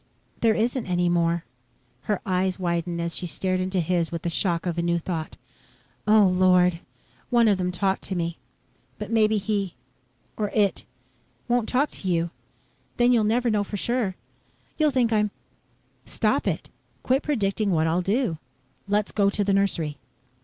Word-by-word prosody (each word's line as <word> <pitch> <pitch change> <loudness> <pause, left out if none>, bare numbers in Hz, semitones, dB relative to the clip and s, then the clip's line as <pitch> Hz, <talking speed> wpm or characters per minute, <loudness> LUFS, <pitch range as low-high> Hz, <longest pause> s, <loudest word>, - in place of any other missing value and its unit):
"There 225 -2 +3
isn't 235 +1 0
any 175 -1 +1
more." 170 -1 +1 0.7
Her 210 - +1
eyes 185 0 0
widened 170 -1 -2
as 170 -1 -3
she 180 - -3
stared 185 +2 -1
into 185 0 -1
his 170 0 0
with 170 -1 -4
the 170 - -1
shock 170 -1 0
of 175 -1 -1
a - - +2
new 170 0 +1
thought. 165 -2 -4 0.7
"Oh, 215 0 +6
Lord! 180 -2 +4 0.5
One 235 -2 +4
of 200 -3 +3
them 180 0 0
talked 190 +1 0
to 190 - -4
me, 170 -1 -2 0.6
but - - -6
maybe 220 -1 +3
he 200 -2 -2 0.6
or 210 -1 -1
it 205 -3 +1 0.6
won't 240 -2 +1
talk 275 +4 +1
to 190 - -7
you. 170 -1 +1 0.7
Then 245 0 +4
you'll 235 -3 +4
never 235 +3 +2
know 210 -1 +2
for 205 +1 -5
sure! 235 -3 -1 0.6
You'll 310 -1 +3
think 250 -4 +1
I'm 210 -1 +2 0.4
..." - - -40
"Stop - - +1
it. - - -2 0.4
Quit 260 +2 +2
predicting 215 -7 0
what 160 -4 +2
I'll 165 +2 +1
do. 195 - 0 0.5
Let's 205 +1 0
go 200 -2 +3
to 205 +1 -1
the 200 0 +1
nursery." 170 -7 0
190 Hz, 170 wpm, -25 LUFS, 175-215 Hz, 0.7 s, Oh